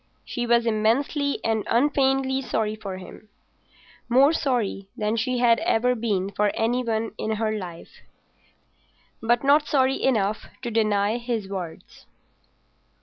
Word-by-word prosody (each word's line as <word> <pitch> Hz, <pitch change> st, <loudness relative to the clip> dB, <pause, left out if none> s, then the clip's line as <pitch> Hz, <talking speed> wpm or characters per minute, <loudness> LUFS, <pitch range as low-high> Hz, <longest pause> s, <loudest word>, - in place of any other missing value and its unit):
She 240 Hz, -1 st, -3 dB
was 235 Hz, 0 st, +3 dB
immensely 240 Hz, +6 st, +1 dB
and 220 Hz, -2 st, 0 dB
unfeignedly 270 Hz, +1 st, +2 dB
sorry 215 Hz, -4 st, -1 dB
for 195 Hz, -3 st, -7 dB
him—more 240 Hz, -, -2 dB
sorry 240 Hz, -10 st, -1 dB
than 215 Hz, +1 st, 0 dB
she 250 Hz, +2 st, -1 dB
had 235 Hz, -1 st, +4 dB
ever 250 Hz, +3 st, +2 dB
been 205 Hz, -5 st, -1 dB
for 210 Hz, +1 st, +1 dB
any 240 Hz, +3 st, 0 dB
one 225 Hz, -1 st, -1 dB
in 220 Hz, -, -1 dB
her 215 Hz, 0 st, -1 dB
life, 175 Hz, -5 st, -9 dB, 1.2 s
but 235 Hz, +2 st, +2 dB
not 295 Hz, +2 st, +4 dB
sorry 265 Hz, -1 st, +2 dB
enough 215 Hz, -5 st, 0 dB, 0.2 s
to 240 Hz, -, -3 dB
deny 215 Hz, -1 st, +1 dB
his 235 Hz, -4 st, -3 dB
words. 185 Hz, -4 st, -8 dB
230 Hz, 130 wpm, -24 LUFS, 215-255 Hz, 1.2 s, had